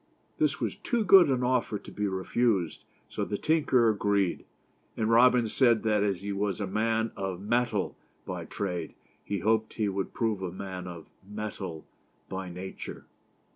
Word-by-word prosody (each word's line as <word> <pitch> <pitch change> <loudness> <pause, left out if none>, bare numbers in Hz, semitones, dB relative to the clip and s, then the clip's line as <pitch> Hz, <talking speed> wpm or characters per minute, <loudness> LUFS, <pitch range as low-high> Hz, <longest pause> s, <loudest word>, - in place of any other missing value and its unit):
This - - +2
was - - -2
too 240 -3 0
good 190 -5 +8
an 130 -2 +1
offer 125 -4 +1
to 100 - -12
be 105 0 -1
refused, 95 -2 0 0.2
so - - -3
the 100 - -2
tinker 145 -6 +3
agreed, 100 -3 +1 0.5
and 110 0 +1
Robin 120 0 +5
said 115 0 +3
that 105 -2 +2
as 100 -3 0
he 100 +1 -4
was 100 -1 -1
a 100 - -1
man 110 +3 0
of 95 -2 -3
7netal 110 -1 0 0.3
by - - -5
trade, 90 -5 -4 0.3
he 100 -3 -3
hoped 110 +2 +1
he 110 -2 0
would 95 -1 -3
prove 110 -5 0
a 95 -2 -3
man 95 -1 -6
of 85 -2 -8 0.2
mettle 100 -5 -6 0.4
by 95 -1 -4
nature. 90 +2 -7
105 Hz, 165 wpm, -29 LUFS, 95-115 Hz, 0.5 s, good